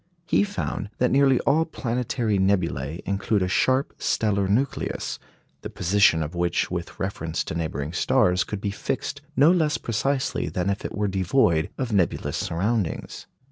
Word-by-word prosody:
He 170 - +3
found 200 - -3
that 125 - +2
nearly 135 -1 +4
all 155 +4 +3
planetary 120 - -1
nebulæ 85 -6 0
include 100 +1 0
a - - 0
sharp 130 +8 +1
stellar 100 -3 +1
nucleus, 125 +8 -1 0.4
the - - -6
position 90 -3 +3
of 75 +3 -6
which 85 0 0
with 85 -1 -5
reference 85 -4 -2
to - - -5
neighbouring 80 -2 -3
stars 90 +1 +2
could 105 -2 -6
be 100 - -1
fixed 135 +6 -4
no 145 +5 +6
less 155 -5 +2
precisely 130 +4 -1
than 90 +2 -1
if 100 - -4
it - - -5
were 105 0 +1
devoid 95 -3 +2
of 125 -4 -2
nebulous 95 -5 0
surroundings. 100 +1 -2
100 Hz, 155 wpm, -24 LUFS, 90-130 Hz, 0.4 s, no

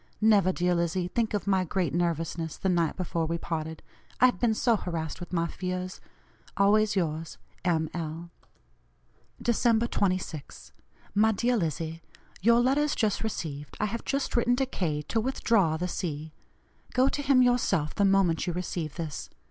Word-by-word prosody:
Never, 210 -4 +5
dear 180 0 +1
Lizzie, 175 +1 0
think 220 +1 0
of 205 - -2
my 190 -2 +2
great 180 0 -1
nervousness 165 -1 -1
the 190 - -1
night 170 -3 +1
before 170 -3 -1
we 165 +1 -1
parted; 160 -1 -4 0.4
I - - +7
had 250 - +3
been 230 -3 +2
so 235 +1 +3
harassed 165 -6 -4
with 175 - -8
my 170 -2 +1
fears. 185 +1 -4 0.6
"Always 210 +2 +4
yours, 160 -3 -2 0.3
"M. 165 -3 +1
L." 170 0 -5 1.1
"December 235 -1 +2
26. 185 -9 -2 0.4
"MY 215 +2 +4
DEAR 240 +4 +1
LIZZIE: 165 - -2 0.4
Your 235 +4 +5
letters 290 +4 +2
just 215 -2 0
received. 150 -9 -5
I 210 - +1
have 225 +3 -4
just 275 0 -1
written 240 +1 +3
to 270 +1 +1
K. 155 - -2
to 225 +9 -1
withdraw 215 -9 +2
the 180 +2 -2
C. 155 -3 -4 0.6
Go 255 +1 +5
to 285 - -1
him 275 -2 +5
yourself 200 -11 +2
the 205 - +1
moment 195 -4 +3
you 175 - 0
receive 170 -3 -4
this. 160 -4 -5
185 Hz, 165 wpm, -28 LUFS, 165-220 Hz, 1.1 s, I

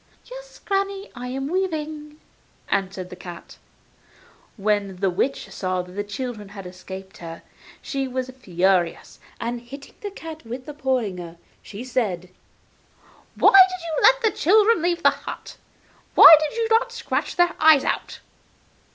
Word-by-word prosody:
'Yes, - - -11
granny, 395 0 -2
I 250 0 -7
am 270 +2 -4
weaving,' 310 -4 -3 0.5
answered 190 -1 -2
the - - -7
cat. 175 -1 -11 1.0
When 205 -2 0
the 190 0 0
witch 210 +2 -2
saw 185 -1 -2
that 180 - -14
the 205 +3 -4
children 210 0 -6
had 195 -2 -10
escaped 190 +1 -10
her, 165 -1 -9 0.4
she 275 -1 -3
was 260 0 -4
furious, 185 -7 -1 0.2
and, 235 +1 -4
hitting 275 +4 -12
the 410 - -4
cat 325 -5 -10
with 245 +3 -8
a 300 - -6
porringer, 215 - -3 0.2
she 210 +3 -9
said: 210 -9 -2 1.1
'Why - - +5
did 370 -2 +6
you 320 -2 -2
let - - +6
the 440 - +3
children 420 +3 +3
leave 345 0 -1
the 280 - +6
hut? - - -9 0.6
Why 325 - +11
did 310 +8 -3
you 455 -1 0
not 450 +1 +3
scratch - - -3
their 350 0 +3
eyes 315 -3 +6
out? - - -3
255 Hz, 150 wpm, -23 LUFS, -, 1.1 s, Why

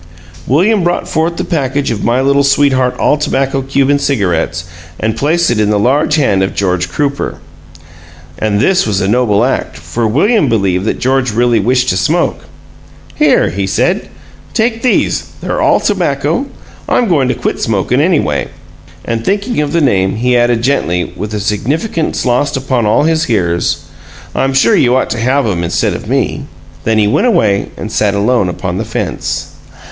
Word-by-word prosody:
William 190 - +2
brought 175 +1 -1
forth 165 +1 -1
the - - -2
package 140 -3 -1
of 110 - -3
My 120 +2 +1
Little 140 +1 +2
Sweetheart 135 -2 +2
All 150 - +2
Tobacco 135 -2 0
Cuban 135 +1 +1
Cigarettes 90 - -1 0.4
and 110 0 -1
placed 160 +4 +1
it 115 - 0
in 105 -1 +2
the 105 - +2
large 140 +8 +2
hand 115 -11 +2
of 95 - -1
George 90 -2 0
Crooper. 140 +6 -2 1.0
And 105 -1 0
this 185 - +2
was 100 -3 0
a 95 - 0
noble 110 -1 +2
act, 130 - -2
for 115 -1 -2
William 155 - +2
believed 100 -4 0
that - - -1
George 130 -1 0
really 120 +1 +2
wished 125 +4 +1
to 90 - 0
smoke. 90 - 0 0.7
"Here," - - +3
he 95 +2 -2
said, - - 0 0.5
"take 225 0 0
these; 250 - +1
they're - - -2
all - - +3
tobacco. - - -1 0.4
I'm 245 - +2
goin' 145 -8 +2
to 130 - 0
quit - - -3
smokin', 115 +4 +1
anyway." 145 - +1 0.6
And, 115 -1 -2
thinking 200 - -1
of 145 - -2
the 170 - +1
name, 95 -9 +1
he 125 +3 +1
added, 120 -1 +2
gently, 90 -10 0
with 105 +3 -5
a - - -2
significance 140 - -2
lost 135 +3 +1
upon 130 -4 -1
all 105 - +3
his 160 +1 +1
hearers, 85 -8 0 0.5
"I'm 135 0 0
sure 135 -4 +4
you 125 0 +3
ought 130 - 0
to 115 - -2
have 130 +4 +1
'em 90 -6 -1
instead 85 0 0
of - - -7
me." - - -1 0.4
Then 110 0 +2
he 105 - +3
went 200 - +2
away 105 - +2
and 110 - -6
sat 105 -2 +1
alone 100 -1 +1
upon 90 - -4
the - - -1
fence. - - -3
125 Hz, 175 wpm, -13 LUFS, 105-145 Hz, 1.0 s, sure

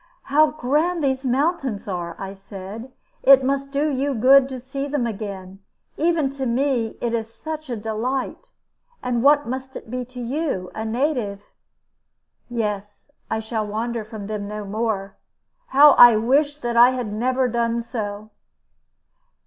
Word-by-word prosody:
"How 310 +1 +6
grand 305 +4 0
these 265 -1 0
mountains 265 - -1
are!" 175 -3 -4
I 195 0 -6
said. 200 +5 -9 0.3
"It 270 0 +7
must 275 +1 -1
do 285 +2 +1
you 280 -1 -1
good 265 +3 +6
to 260 - -5
see 270 +3 -5
them 285 -4 -1
again. 195 -4 -6 0.4
Even 320 -3 +1
to 270 -2 -4
me 240 -2 0
it 235 -1 -2
is 225 -1 -2
such 310 +3 -7
a 240 - -2
delight. 235 - -3 0.6
And 245 -2 0
what 290 +1 +4
must 260 +2 -5
it 220 - -9
be 250 0 -2
to 250 +1 -11
you, 245 - -3
a 220 - -4
native?" 230 -4 -1 1.1
"Yes, 210 +1 -4 0.2
I - - -1
shall 220 -1 -3
wander 225 +2 -3
from 215 -1 -8
them 210 -1 -4
no 210 0 -6
more. 205 -2 -3 0.5
How 290 +2 +7
I 240 -4 +8
wish 280 +7 +2
that 240 -4 -3
I 240 +1 +8
had 250 -5 -3
never 255 +4 +1
done 235 0 -1
so?" 215 -3 -5
240 Hz, 155 wpm, -22 LUFS, 215-275 Hz, 1.1 s, I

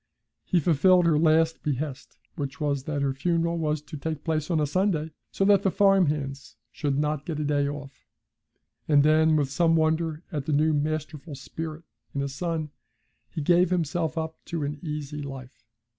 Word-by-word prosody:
He 180 - +2
fulfilled 175 +3 +4
her 160 -3 +3
last 160 0 +3
behest, 145 -1 -4 0.2
which 140 -3 -5
was 140 -3 -1
that 145 -2 -2
her 135 -1 +1
funeral 170 +3 0
was 150 -1 -1
to 150 - -9
take 155 +1 -4
place 155 -1 -1
on 165 -3 +2
a 150 - +2
Sunday, 160 -1 0 0.2
so 195 - 0
that 200 -1 +5
the 195 - +2
farm 195 -2 +4
hands 140 -2 -4 0.2
should 140 -3 -1
not 150 0 0
get 155 -2 -4
a - - -1
day 145 -1 +1
off; 140 -1 -8 0.8
and 145 -2 +5
then, 155 +1 +4
with 145 -3 +1
some 165 +1 +3
wonder 160 0 +1
at 145 -4 -4
the 155 - +1
new 155 +2 +3
masterful 155 0 -3
spirit 160 +3 -7 0.3
in 140 - 0
his 140 -1 -3
son, 160 -1 -3 0.6
he 155 - -5
gave 175 +3 +4
himself 165 -2 -1
up 160 0 -4
to 165 -3 -3
an 145 +1 -4
easy 150 -2 -5
life. 135 -2 -9
155 Hz, 185 wpm, -26 LUFS, 145-165 Hz, 0.8 s, that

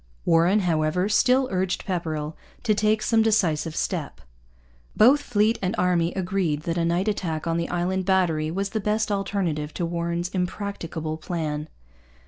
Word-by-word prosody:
Warren, 175 +6 +4
however, 170 +1 +1
still 250 +5 +3
urged 185 0 -1
Pepperrell 160 -5 -3 0.3
to 220 -3 +3
take 215 +1 +1
some 225 -1 +3
decisive 175 -8 +1
step. - - -3 0.8
Both 265 +7 +6
fleet 220 -4 +1
and 185 -1 -1
army 175 -2 +2
agreed 180 -5 -1
that 165 0 -2
a - - +1
night 170 +4 0
attack 170 -7 -2
on 165 0 0
the 170 - -2
Island 180 +2 -1
Battery 175 -5 +2
was 195 +4 -2
the 220 - -2
best 215 +1 0
alternative 185 -7 -2
to 175 - -1
Warren's 170 +1 -2
impracticable 180 -4 -3
plan. 155 -2 -4
180 Hz, 150 wpm, -24 LUFS, 165-200 Hz, 0.8 s, Both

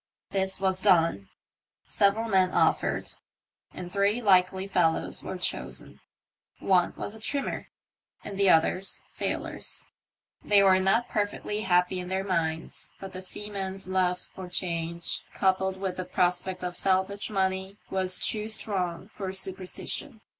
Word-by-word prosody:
This 190 -1 0
was 190 -1 +2
done; 165 - +3 0.6
several 205 +3 +2
men 190 -3 +3
offered, - - +1 0.6
and 180 -1 -8
three 200 +3 +2
likely 190 -3 +3
fellows 175 -4 +1
were 190 - -5
chosen. 180 - -4 0.6
One 180 -2 +2
was 205 - -4
a 220 - -9
trimmer, 275 +5 -3 0.6
the 200 -1 +1
others 180 +3 +2
sailors. - - -3 0.6
They 205 -1 +5
were 190 -1 +5
not 195 +6 +2
perfectly 210 0 -2
happy 180 -1 +2
in 180 - -6
their 190 +1 -1
minds, 165 -4 -3
but 195 - -8
the 185 - -6
seaman's 195 0 -6
love 185 -1 0
of 185 -1 -8
change, 170 -2 -1
coupled 190 0 +1
with 190 -1 -3
the 185 - -3
prospect 180 +1 -1
of 180 -1 -3
salvage 190 +2 +2
money, 190 -1 -1
was 185 -1 +4
too 215 0 0
strong 185 -5 +2
for 200 -2 -7
supersti 190 -1 -4
tion. 220 - -1
190 Hz, 135 wpm, -27 LUFS, 180-200 Hz, 0.6 s, They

